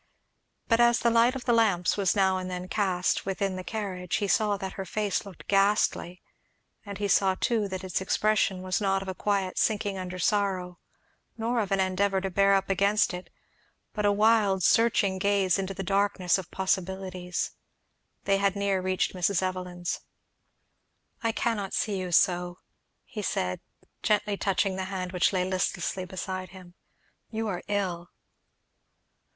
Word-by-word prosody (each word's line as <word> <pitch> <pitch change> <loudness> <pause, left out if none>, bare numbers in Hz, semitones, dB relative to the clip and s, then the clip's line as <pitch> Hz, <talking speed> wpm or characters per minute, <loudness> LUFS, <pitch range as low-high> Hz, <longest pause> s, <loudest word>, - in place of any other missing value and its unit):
But 230 -1 +3
as 240 0 +5
the 235 - +2
light 235 +3 +4
of 260 - -6
the 240 - +3
lamps 200 -7 +3
was 200 -1 +1
now 190 -2 +3
and 185 0 -5
then 180 0 -5
cast 185 -3 0
within 195 0 -2
the 185 - -5
carriage 185 -4 -3
he 205 - 0
saw 205 0 +2
that 190 -1 -5
her 195 - -5
face 205 +1 -2
looked 185 -5 -13
ghastly; 195 -3 +1 0.6
and 200 -2 -7
he 205 - -1
saw 195 -1 +3
too 220 -1 0
that 190 -1 -5
its 185 0 -2
expression 195 -1 +1
was 185 +2 -1
not 195 -1 +1
of - - -11
a 190 - -2
quiet 195 -1 -1
sinking 205 -3 0
under 185 0 -5
sorrow, 185 -2 0 0.6
nor 235 +2 0
of 205 -3 -2
an 195 - +2
endeavour 190 +1 +1
to 190 0 -3
bear 195 +1 +4
up 195 0 0
against 200 +1 +2
it, 180 +1 -7 0.6
but 210 - -2
a 205 - +4
wild 205 -3 +3
searching 205 -4 +3
gaze 200 -2 +2
into 195 0 -3
the 195 - -4
darkness 195 -1 +1
of 185 - -8
possibilities. 190 -1 -2 0.7
They 195 0 +2
had 200 0 +1
near 200 -2 0
reached 185 0 0
Mrs. 185 +1 +1
Evelyn's. 180 -2 -3 1.2
"I 230 - +1
cannot 215 -4 -2
see 200 -3 -1
you 180 -1 -4
so," 175 0 +2 0.5
he 215 - -7
said, 90 - -2 0.4
gently 210 -1 +1
touching 195 -1 0
the 190 - -2
hand 185 -2 -4
which 180 -1 +2
lay 185 -2 0
listlessly 185 0 -1
beside 185 0 -5
him. 185 -2 -13 0.6
"You 225 0 -3
are 180 -3 -3
ill!" 185 -4 -2
195 Hz, 165 wpm, -27 LUFS, 185-205 Hz, 1.2 s, as